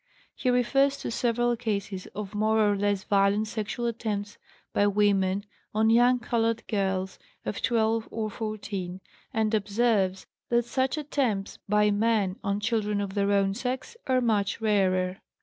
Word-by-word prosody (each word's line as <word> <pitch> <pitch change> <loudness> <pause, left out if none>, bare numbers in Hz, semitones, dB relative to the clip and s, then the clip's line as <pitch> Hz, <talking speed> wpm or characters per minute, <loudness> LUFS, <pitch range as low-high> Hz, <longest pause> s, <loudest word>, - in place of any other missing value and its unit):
" - - -30
He 255 - -1
refers 270 +3 +3
to - - -3
several 240 0 +1
cases 200 -5 -3
of 210 -1 -5
more 215 +1 +2
or 205 - +2
less 200 -1 0
violent 200 +2 +2
sexual 215 +2 -3
attempts 215 -3 -3 0.3
by 205 - +3
women 200 -1 +2 0.3
on 220 +1 +4
young 245 +2 +5
colored 230 -1 0
girls 190 -3 -1 0.3
of 210 - -3
12 225 -1 +1
or 215 -1 -3
14, 200 -4 -5 0.3
and 220 0 0
observes 205 -2 +1 0.2
that 240 -1 +2
such 260 +4 0
attempts 255 -9 -1
by 210 0 +4
men 205 -3 +1
on 200 +1 0
children 210 -1 0
of 200 -1 -3
their 200 0 +1
own 195 -1 +2
sex 255 - -4
are 255 -1 +3
much 210 -4 +1
rarer. 190 -4 +1
210 Hz, 150 wpm, -27 LUFS, 200-235 Hz, 0.3 s, young